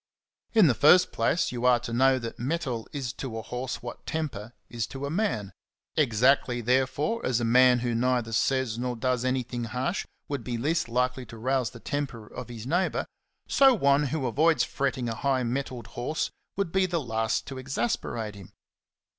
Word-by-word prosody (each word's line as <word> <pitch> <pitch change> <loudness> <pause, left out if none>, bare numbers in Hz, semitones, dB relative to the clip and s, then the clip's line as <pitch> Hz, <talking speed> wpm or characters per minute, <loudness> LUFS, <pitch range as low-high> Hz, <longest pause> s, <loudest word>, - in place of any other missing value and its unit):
In 215 -4 +7
the 140 - +5
first 155 +9 +6
place 175 - +1
you 120 -1 -5
are 125 -1 +5
to 120 -1 -5
know 130 +2 +4
that 115 -2 -6
mettle 130 -3 -2
is 135 -4 -4
to 130 -5 -5
a 110 - -5
horse 125 +1 -5
what 120 - -8
temper 130 -9 -3 0.2
is 115 -2 -3
to 135 +1 -6
a 140 - -3
man. 160 - -1 0.4
Exactly, 125 -1 +3
therefore, 130 - +1
as 125 -2 +1
a 120 - 0
man 125 +1 +5
who 120 -1 -1
neither 120 -1 +1
says 120 0 +1
nor 125 0 -2
does 125 0 0
anything 125 -2 -1
harsh 125 - -2 0.2
would 140 -4 -3
be 120 -1 -3
least 150 +2 0
likely 125 +1 0
to 115 - -10
rouse 130 0 0
the 120 - -12
temper 135 -5 -4
of 105 - -8
his 115 -2 -8
neighbour, 175 +8 0 0.4
so 270 -2 +6
one 140 -5 +3
who 150 0 -2
avoids 145 +2 +3
fretting 130 -1 -1
a 115 - -1
high 130 +2 0
mettled 125 -1 -3
horse 140 +7 -2 0.3
would 200 -4 -1
be 190 0 +2
the 170 -2 0
last 110 -5 -1
to 135 -1 -7
exasperate 120 -4 -2
him. 100 -3 -12
125 Hz, 185 wpm, -27 LUFS, 120-140 Hz, 0.4 s, In